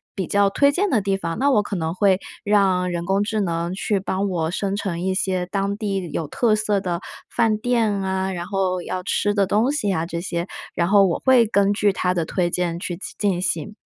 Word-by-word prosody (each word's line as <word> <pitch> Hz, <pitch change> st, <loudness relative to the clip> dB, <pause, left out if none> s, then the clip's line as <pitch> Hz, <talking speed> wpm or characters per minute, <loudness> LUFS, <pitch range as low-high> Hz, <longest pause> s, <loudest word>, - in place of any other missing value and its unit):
比 190 Hz, -, -2 dB
较 200 Hz, 0 st, +3 dB
推 280 Hz, +8 st, +3 dB
荐 390 Hz, +7 st, 0 dB
的 225 Hz, -8 st, +2 dB
地 195 Hz, 0 st, 0 dB
方？ 165 Hz, -2 st, -4 dB
那 280 Hz, -, +3 dB
我 210 Hz, -, +4 dB
可 205 Hz, -, -4 dB
能 160 Hz, -2 st, -2 dB
会 190 Hz, 0 st, +3 dB, 0.3 s
让 190 Hz, -3 st, +2 dB
人 170 Hz, -1 st, -2 dB
工 195 Hz, +2 st, +1 dB
智 215 Hz, 0 st, -1 dB
能 170 Hz, -1 st, -2 dB
去 200 Hz, +1 st, -1 dB
帮 195 Hz, +1 st, -2 dB
我 165 Hz, -3 st, -1 dB
生 195 Hz, +1 st, -2 dB
成 180 Hz, -4 st, -3 dB
一 190 Hz, +1 st, 0 dB
些 185 Hz, -2 st, 0 dB
当 200 Hz, +1 st, -1 dB
地 195 Hz, -5 st, -3 dB
有 160 Hz, -, -2 dB
特 220 Hz, -, +2 dB
色 210 Hz, -1 st, 0 dB
的 180 Hz, -2 st, -3 dB, 0.3 s
饭 225 Hz, -2 st, +1 dB
店 230 Hz, -1 st, +1 dB
啊， 190 Hz, -1 st, -1 dB
然 175 Hz, -1 st, -4 dB
后 185 Hz, -2 st, -1 dB
要 185 Hz, -, -4 dB
吃 205 Hz, +1 st, 0 dB
的 200 Hz, -2 st, +2 dB
东 220 Hz, +7 st, +2 dB
西 215 Hz, -9 st, 0 dB
啊 165 Hz, -3 st, -1 dB
这 170 Hz, 0 st, -4 dB
些， 170 Hz, 0 st, -3 dB, 0.3 s
然 170 Hz, 0 st, +1 dB
后 200 Hz, 0 st, +6 dB
我 175 Hz, -, 0 dB
会 255 Hz, -3 st, +6 dB
根 200 Hz, -1 st, +2 dB
据 205 Hz, -1 st, +2 dB
它 180 Hz, -1 st, 0 dB
的 170 Hz, -3 st, -1 dB
推 175 Hz, +1 st, 0 dB
荐 175 Hz, -1 st, -1 dB
去 175 Hz, -2 st, -5 dB, 0.2 s
进 195 Hz, -4 st, 0 dB
行。 170 Hz, +2 st, -2 dB
195 Hz, 240 characters per minute, -22 LUFS, 180-205 Hz, 0.3 s, 后